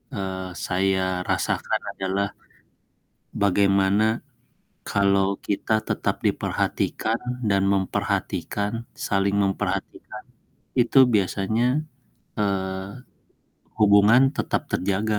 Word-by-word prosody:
eee, 95 -2 -4 0.2
saya 95 -1 0
rasakan - - 0
adalah 95 +1 -1 1.2
bagaimana 100 +1 +3 0.8
kalau 100 -1 +2 0.2
kita 105 +2 -1 0.2
tetap - - 0
diperhatikan 110 +1 -1 0.3
dan 100 -1 +3
memperhatikan 100 +1 -1 0.4
saling 100 0 +1
memperhatikan 100 +2 -3 0.6
itu 125 +2 +4 0.2
biasanya, 105 +3 +1 0.7
eee, 95 -2 -1 0.9
hubungan 105 +3 +6
tetap - - -1
terjaga 105 +3 0
100 Hz, 75 wpm, -24 LUFS, 95-105 Hz, 1.2 s, hubungan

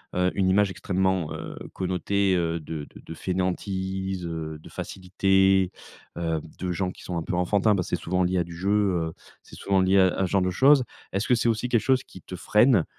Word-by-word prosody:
heu, 90 0 +2
une 95 -2 +2
image 100 +2 +3
extrêmement, 95 -3 -1
heu, - - -7 0.2
connotée, 95 +1 0
heu, 85 -1 0
de 75 -1 -6
de - - -12
de - - -8
fainéantise, 95 +1 -2
heu, 80 -2 -5
de - - -14
facilité, 95 0 +1 0.4
heu, 80 -2 -1 0.2
de 90 -1 -2
gens 90 +1 -1
qui - - -14
sont 90 - -4
un 85 - -2
peu - - -4
enfantins, 100 +4 +2
parce 90 - -2
c'est - - +1
souvent 90 +2 -1
lié 90 +1 +1
à 90 - +2
du 85 0 -10
jeu, 95 +4 -2
heu, 95 -6 +1 0.3
c'est - - -15
souvent 95 -1 +1
lié 95 +1 +3
à 95 -1 +6
à - - -2
ce - - -9
genre 100 - +3
de 90 - 0
choses. 135 +7 +5 0.3
Est-ce 100 +2 -1
que 130 - +4
c'est 120 0 +1
aussi 115 +2 -1
quelque 115 -3 +3
chose 130 -1 +2
qui 95 - -14
te 90 - -8
freine, 105 0 +3
95 Hz, 220 wpm, -25 LUFS, 90-100 Hz, 0.4 s, à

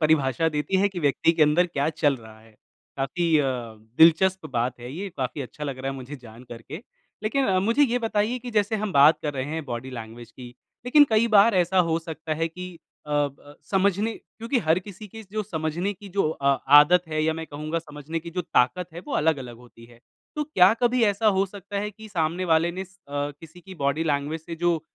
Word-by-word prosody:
परिभाषा 155 -1 +2
देती 150 +5 -1
है 200 - +3
कि 190 -3 -6
व्यक्ति 145 +2 +2
के 165 -2 +2
अंदर 155 +4 +4
क्या 145 -3 -1
चल 150 -3 +1
रहा 110 -2 -14
है? 110 0 -20 0.5
काफ़ी 160 +4 +1
अ, 145 - +2 0.5
दिलचस्प 185 +4 +5
बात 120 +1 -1
है 120 - -8
ये, 195 +5 -5
काफ़ी 130 +2 -3
अच्छा 150 +4 -8
लग 135 -3 -4
रहा 135 +1 -3
है 135 - -6
मुझे 135 +2 -8
जान 120 -1 -14
कर 115 -1 -9
के। 155 - -9 0.4
लेकिन 265 +5 0
अ, 190 -1 +2
मुझे 230 +8 +2
ये 245 -3 +2
बताइए 225 +1 -1
कि 245 0 -8
जैसे 210 -1 +1
हम 210 -3 -2
बात 145 +3 +6
कर 150 - -2
रहे 130 - -2
हैं 155 +2 -4
बॉडी 125 0 -6
लैंग्वेज 115 -1 -9
की, 125 +2 -11 0.4
लेकिन 290 +3 +7
कई 220 +2 +3
बार 205 +1 +6
ऐसा 185 +1 +2
हो 165 0 +1
सकता 160 -1 -5
है 165 +1 -1
कि 180 +2 -8 0.4
अ - - -9
ब 145 0 -2 0.2
समझने 200 +3 +1
क्योंकि 230 +4 -4
हर 165 -4 +2
किसी 205 +3 -10
के 220 +3 -10
जो 215 0 -1
समझने 170 +1 -3
की 200 +1 -13
जो 175 - +2
अ 140 -3 +1 0.2
आदत 175 +4 +5
है 155 0 -1
या 160 - +2
मैं 160 0 -6
कहूँगा 155 +3 -4
समझने 155 0 -6
की 170 +1 -9
जो 180 - -2
ताकत 165 +3 +1
है 170 - -8
वो - - -6
अलग-अलग 135 -7 -1
होती 120 -1 -17
है। 120 -1 -19 0.4
तो 300 - -1
क्या 195 -10 +5
कभी 245 0 +3
ऐसा 205 +1 +1
हो 195 - +3
सकता 200 +1 -7
है 210 +1 -3
कि 220 +1 -13
सामने 170 -1 -1
वाले 165 0 +2
ने 185 - -6
अ, 190 - -10 0.2
किसी 145 +4 -6
की 190 +1 -12
बॉडी 145 +1 -1
लैंग्वेज 150 +1 -1
से 170 0 -6
जो 170 -1 +1
160 Hz, 225 wpm, -25 LUFS, 145-195 Hz, 0.5 s, लेकिन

